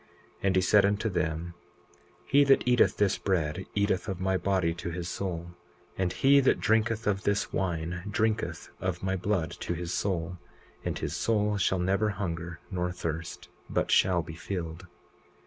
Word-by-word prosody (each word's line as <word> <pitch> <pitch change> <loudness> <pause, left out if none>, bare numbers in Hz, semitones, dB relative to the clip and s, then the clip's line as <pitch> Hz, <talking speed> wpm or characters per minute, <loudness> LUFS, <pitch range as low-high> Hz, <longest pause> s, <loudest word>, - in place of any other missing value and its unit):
20:8 - - -30 0.3
And 95 -1 +2
he 95 - +4
said 100 +2 +5
unto 100 +3 +1
them: 85 -1 -2 0.7
He 145 +1 +5
that 135 -2 +4
eateth 125 -1 +4
this 100 -2 +2
bread 90 -1 -1
eateth 100 -2 +1
of 95 -3 -3
my 95 0 +1
body 95 -3 +1
to 85 +1 -5
his 85 0 -4
soul; 85 -2 -4 0.4
and 95 -2 0
he 135 +9 +5
that 135 - +3
drinketh 110 0 +1
of 100 -1 +1
this 100 +1 0
wine 85 -1 -2
drinketh 110 +1 -1
of 95 -1 -3
my 95 0 0
blood 90 -3 -1
to 85 - -2
his 85 +1 -4
soul; 90 -2 -2 0.4
and - - -2
his - - -3
soul 105 -2 +1
shall 95 0 +2
never 95 +4 +1
hunger 85 -4 -4
nor 90 -1 -1
thirst, 85 -1 -5 0.2
but - - 0
shall 90 -3 +4
be 80 - -8
filled. 85 0 -5
95 Hz, 170 wpm, -29 LUFS, 85-100 Hz, 0.7 s, said